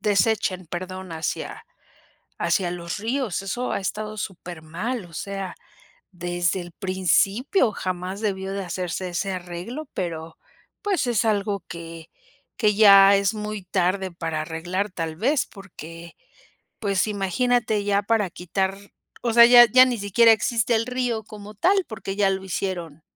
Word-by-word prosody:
desechen, 200 Hz, -2 st, +1 dB
perdón, 185 Hz, +1 st, -6 dB
hacia 160 Hz, 0 st, -4 dB, 0.7 s
hacia 180 Hz, -4 st, +1 dB
los 170 Hz, +1 st, -5 dB
ríos, 225 Hz, -2 st, -2 dB
eso 240 Hz, +6 st, -3 dB
ha -, -, -1 dB
estado 215 Hz, +2 st, -4 dB
súper 175 Hz, -4 st, -6 dB
mal 190 Hz, +7 st, -4 dB
o 170 Hz, -, -16 dB
sea, 195 Hz, +3 st, -5 dB, 0.6 s
desde 175 Hz, +1 st, -1 dB
el 175 Hz, 0 st, -9 dB
principio 195 Hz, -, +1 dB
jamás 185 Hz, +1 st, -4 dB
debió 195 Hz, -3 st, -2 dB
de 195 Hz, 0 st, -3 dB
hacerse 180 Hz, +1 st, -3 dB
ese 190 Hz, +2 st, -2 dB
arreglo 185 Hz, -, -6 dB
pero 165 Hz, -2 st, -4 dB, 0.5 s
pues 395 Hz, -10 st, 0 dB
es 235 Hz, -2 st, +1 dB
algo 200 Hz, -3 st, 0 dB
que 165 Hz, -1 st, -9 dB, 0.5 s
que 210 Hz, -3 st, +3 dB
ya 200 Hz, -1 st, +8 dB
es 200 Hz, +2 st, +1 dB
muy 210 Hz, -1 st, -5 dB
tarde 185 Hz, +1 st, 0 dB
para 165 Hz, -2 st, -3 dB
arreglar 175 Hz, +6 st, -3 dB
tal 165 Hz, -3 st, -4 dB
vez 260 Hz, -, +1 dB
porque 170 Hz, -4 st, -11 dB, 0.6 s
pues 200 Hz, -1 st, +1 dB
imagínate 215 Hz, +2 st, 0 dB
ya 200 Hz, 0 st, +2 dB
para 210 Hz, -1 st, +1 dB
quitar 190 Hz, +3 st, -2 dB, 0.5 s
O 235 Hz, -, 0 dB
sea 235 Hz, +1 st, +9 dB
ya 240 Hz, 0 st, +9 dB
ya 255 Hz, +3 st, +7 dB
ni 250 Hz, -, -1 dB
siquiera 225 Hz, +3 st, +5 dB
existe 230 Hz, +2 st, +1 dB
el 220 Hz, -, +1 dB
río 245 Hz, -3 st, -2 dB
como 210 Hz, 0 st, -11 dB
tal 380 Hz, -, +2 dB
porque 195 Hz, -3 st, -6 dB
ya 205 Hz, -1 st, +3 dB
lo 190 Hz, 0 st, -3 dB
hicieron, 175 Hz, -5 st, -4 dB
195 Hz, 150 wpm, -24 LUFS, 180-220 Hz, 0.7 s, sea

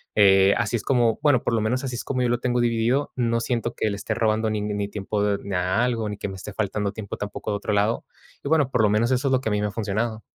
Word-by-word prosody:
eh, 95 Hz, -1 st, +6 dB
así 105 Hz, +3 st, 0 dB
es -, -, -7 dB
como, 120 Hz, -4 st, +2 dB
bueno, 145 Hz, -5 st, +4 dB
por -, -, 0 dB
lo 110 Hz, -, +2 dB
menos 125 Hz, +5 st, 0 dB
así 125 Hz, -2 st, -3 dB
es -, -, -4 dB
como 130 Hz, -2 st, -2 dB
yo 125 Hz, -, +1 dB
lo 120 Hz, 0 st, +1 dB
tengo 125 Hz, -1 st, 0 dB
dividido. 120 Hz, +4 st, +1 dB
No 115 Hz, -2 st, +1 dB
siento 120 Hz, 0 st, -2 dB
que 110 Hz, -, 0 dB
le 100 Hz, -, -2 dB
esté 110 Hz, -, -3 dB
robando 110 Hz, -1 st, +1 dB
ning 105 Hz, -1 st, -2 dB
ni 100 Hz, -1 st, -1 dB
tiempo 105 Hz, 0 st, -1 dB
ni 100 Hz, -1 st, -5 dB
a 90 Hz, +6 st, +1 dB
algo, 115 Hz, -3 st, 0 dB
ni 105 Hz, -, -5 dB
que -, -, -4 dB
me 95 Hz, -, -7 dB
esté 95 Hz, +1 st, -8 dB
faltando 105 Hz, -1 st, -1 dB
tiempo, 105 Hz, -3 st, -6 dB
tampoco 105 Hz, +1 st, -5 dB
de 100 Hz, -, 0 dB
otro 105 Hz, +1 st, -3 dB
lado. 105 Hz, +3 st, +1 dB, 0.4 s
Y 140 Hz, -, -3 dB
bueno, 150 Hz, -5 st, +3 dB
por 110 Hz, -, +2 dB
lo 105 Hz, -, +4 dB
menos 110 Hz, +3 st, +2 dB
eso 130 Hz, +2 st, +1 dB
es -, -, 0 dB
lo 130 Hz, -, +2 dB
que 110 Hz, -, -2 dB
a -, -, -2 dB
mí 105 Hz, -, +1 dB
me 105 Hz, -, 0 dB
ha -, -, -4 dB
funcionado. 110 Hz, +1 st, -2 dB
110 Hz, 295 wpm, -24 LUFS, 105-120 Hz, 0.4 s, eh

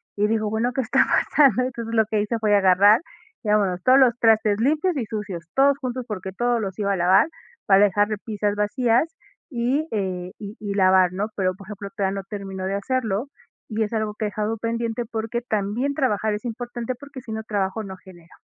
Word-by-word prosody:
y 210 Hz, +1 st, +2 dB
digo: 215 Hz, -1 st, 0 dB
"Bueno 225 Hz, +3 st, 0 dB
¿qué 265 Hz, -, 0 dB
está 220 Hz, -, +3 dB
pasando?". 275 Hz, -4 st, +3 dB
Entonces, 235 Hz, -2 st, -4 dB
lo 220 Hz, -1 st, +4 dB
que 215 Hz, -1 st, 0 dB
hice 220 Hz, +3 st, -1 dB
fue 210 Hz, -2 st, +3 dB
agarrar, 200 Hz, +4 st, +5 dB, 0.4 s
digamos 200 Hz, -4 st, +1 dB
todos 255 Hz, +1 st, +6 dB
los 255 Hz, -3 st, +5 dB
trastes 220 Hz, -2 st, +3 dB
limpios 310 Hz, +7 st, +1 dB
y 240 Hz, -, -1 dB
sucios, 205 Hz, -6 st, -5 dB
todos 275 Hz, +1 st, +4 dB
juntos, 255 Hz, -1 st, -4 dB
porque 190 Hz, -3 st, -5 dB
todos 240 Hz, +3 st, 0 dB
los 190 Hz, -3 st, -4 dB
iba 200 Hz, -1 st, +1 dB
a -, -, -1 dB
lavar 180 Hz, -, +4 dB, 0.4 s
para 195 Hz, 0 st, +6 dB
dejar 205 Hz, +1 st, +2 dB
repisas 210 Hz, -1 st, -2 dB
vacías, 235 Hz, +7 st, +1 dB, 0.4 s
y, 265 Hz, +5 st, 0 dB
eh, 185 Hz, -3 st, -3 dB
y 205 Hz, 0 st, -8 dB
y 205 Hz, -2 st, -4 dB
lavar, 185 Hz, -2 st, +4 dB
¿no? 205 Hz, +4 st, -2 dB
Pero, 185 Hz, -2 st, 0 dB
por 195 Hz, -, -13 dB
ejemplo, 200 Hz, -1 st, -7 dB
todavía 195 Hz, -1 st, -1 dB
no -, -, -19 dB
terminó 195 Hz, -2 st, -5 dB
de 195 Hz, -, -1 dB
hacerlo 225 Hz, +1 st, -1 dB, 0.5 s
y 220 Hz, -, +1 dB
es 215 Hz, +1 st, -4 dB
algo 215 Hz, -1 st, -2 dB
que 215 Hz, -, -3 dB
he -, -, +1 dB
dejado 215 Hz, +2 st, -2 dB
pendiente, 230 Hz, +1 st, -2 dB
porque 225 Hz, +2 st, -3 dB
también 230 Hz, +4 st, -1 dB
trabajar 220 Hz, -6 st, 0 dB
es 210 Hz, +2 st, -5 dB
importante 240 Hz, +1 st, -4 dB
porque 280 Hz, +1 st, -11 dB
si 230 Hz, -, -10 dB
no 220 Hz, 0 st, -4 dB
trabajo, 205 Hz, 0 st, -2 dB
no 190 Hz, -2 st, -7 dB
genero. 175 Hz, -2 st, -17 dB
215 Hz, 205 wpm, -23 LUFS, 200-235 Hz, 0.5 s, todos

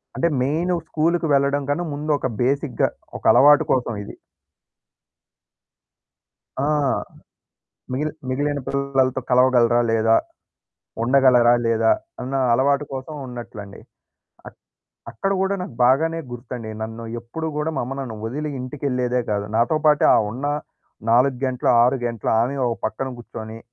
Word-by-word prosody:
అంటే 170 Hz, -, +1 dB
మెయిను 160 Hz, +8 st, 0 dB
స్కూలుకి 165 Hz, +2 st, 0 dB
వెళ్ళడం 140 Hz, +1 st, +2 dB
కన్నా 155 Hz, +5 st, 0 dB
ముందొక 145 Hz, -2 st, -1 dB
బేసిక్‌గా 135 Hz, +1 st, +1 dB, 0.3 s
ఒక -, -, -17 dB
అలవాటు 145 Hz, +1 st, +6 dB
కోసమిది. 115 Hz, -5 st, -2 dB, 2.5 s
ఆ! 135 Hz, -, +1 dB, 1.3 s
మిగిలి 150 Hz, +4 st, -1 dB, 0.2 s
మిగిలిన 145 Hz, +2 st, -1 dB
పిల్లలతో 135 Hz, -2 st, 0 dB
కలవగలరా? 125 Hz, -2 st, +4 dB
లేదా? 115 Hz, 0 st, +3 dB, 0.9 s
ఉండగలరా? 125 Hz, -1 st, +5 dB
లేదా? 115 Hz, -1 st, +3 dB, 0.3 s
అన్న 130 Hz, +2 st, -4 dB, 0.2 s
అలవాటు 140 Hz, +4 st, +2 dB
కోసం 135 Hz, +4 st, -6 dB
ఉన్నట్లండి. 115 Hz, -5 st, -9 dB, 0.7 s
అ -, -, -6 dB, 0.6 s
అక్కడ 115 Hz, +12 st, -3 dB
గూడా 195 Hz, +1 st, +1 dB
నాకు 160 Hz, -, -8 dB
బాగానే 160 Hz, +6 st, +3 dB
గుర్తండి. 120 Hz, -2 st, -7 dB
నన్ను 115 Hz, +1 st, -6 dB, 0.2 s
ఎప్పుడూ 120 Hz, +8 st, -6 dB
గూడా 150 Hz, +2 st, -1 dB
మా -, -, 0 dB
అమ్మ 130 Hz, +3 st, -5 dB
నన్ను 120 Hz, -5 st, -6 dB
వదిలి 150 Hz, +6 st, -4 dB
ఇంటికెళ్ళేదే 125 Hz, -2 st, -1 dB
గాదు. 100 Hz, -1 st, -1 dB
నాతో 120 Hz, +7 st, +2 dB
పాటే 150 Hz, -1 st, +4 dB
ఆ -, -, +6 dB
ఉన్న 125 Hz, +6 st, -6 dB, 0.7 s
4 125 Hz, +2 st, +3 dB
గంటలు, 130 Hz, -1 st, 0 dB
6 125 Hz, +3 st, +3 dB
గంటలు 115 Hz, -3 st, -3 dB
ఆమే 125 Hz, +4 st, 0 dB
ఒక 115 Hz, -1 st, -1 dB
పక్కన 130 Hz, +4 st, -2 dB
గూర్చొని. 110 Hz, -1 st, -8 dB
130 Hz, 125 wpm, -22 LUFS, 120-145 Hz, 2.5 s, అలవాటు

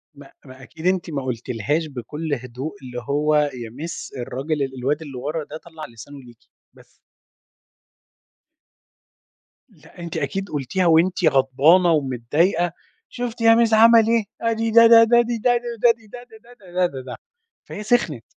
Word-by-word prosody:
ما 140 Hz, -1 st, -15 dB
ما 130 Hz, 0 st, -14 dB
أكيد 160 Hz, +5 st, -12 dB
أنتِ 185 Hz, -2 st, 0 dB
ما 140 Hz, -4 st, -4 dB
قُلتِلهاش 125 Hz, +5 st, -3 dB
بكل 150 Hz, +3 st, -6 dB
هدوء 130 Hz, +3 st, -6 dB
اللي 125 Hz, -1 st, -7 dB
هو 150 Hz, +2 st, +1 dB
"يا 135 Hz, -6 st, -1 dB
miss 145 Hz, +4 st, -8 dB
الراجل 140 Hz, +5 st, -3 dB
ال 135 Hz, -1 st, -5 dB
الواد 145 Hz, +5 st, -1 dB
اللي 140 Hz, -5 st, -9 dB
ورا 150 Hz, +5 st, -4 dB
ده 150 Hz, +1 st, -9 dB
طلَّع 160 Hz, -1 st, -11 dB
لسانُه 140 Hz, +6 st, -12 dB
ليكِ." 120 Hz, -3 st, -16 dB, 0.4 s
بس. -, -, -22 dB, 2.7 s
لأ، -, -, -20 dB
أنتِ 170 Hz, -1 st, -6 dB
أكيد 195 Hz, -1 st, -3 dB
قُلتيها 155 Hz, +6 st, -2 dB
وأنتِ 170 Hz, +2 st, +3 dB
غضبانة 150 Hz, +6 st, +4 dB
ومتضايقة، 155 Hz, -, 0 dB, 0.4 s
"شُفتِ 245 Hz, -1 st, -6 dB
يا 225 Hz, 0 st, +6 dB
مِس 230 Hz, -1 st, +2 dB
عَمَل 225 Hz, 0 st, +6 dB
إيه، 230 Hz, -1 st, +2 dB, 0.2 s
آدي 225 Hz, 0 st, -1 dB
ده، 230 Hz, +1 st, +7 dB
ده، 230 Hz, 0 st, +8 dB
ده، 235 Hz, +1 st, +4 dB
دي، 235 Hz, 0 st, -3 dB
ده، 245 Hz, +2 st, +2 dB
دي، 235 Hz, -1 st, -7 dB
ده، 240 Hz, -, +7 dB
دي، 225 Hz, -1 st, -11 dB
ده، 245 Hz, +4 st, -11 dB, 0.3 s
ده، 195 Hz, -7 st, -18 dB
ده، 180 Hz, +1 st, +1 dB
ده، 135 Hz, -7 st, -5 dB
ده" 125 Hz, -1 st, -8 dB, 0.5 s
فهي 210 Hz, -, -8 dB
سِخنِت. 205 Hz, -, 0 dB
160 Hz, 165 wpm, -21 LUFS, 135-220 Hz, 2.7 s, ده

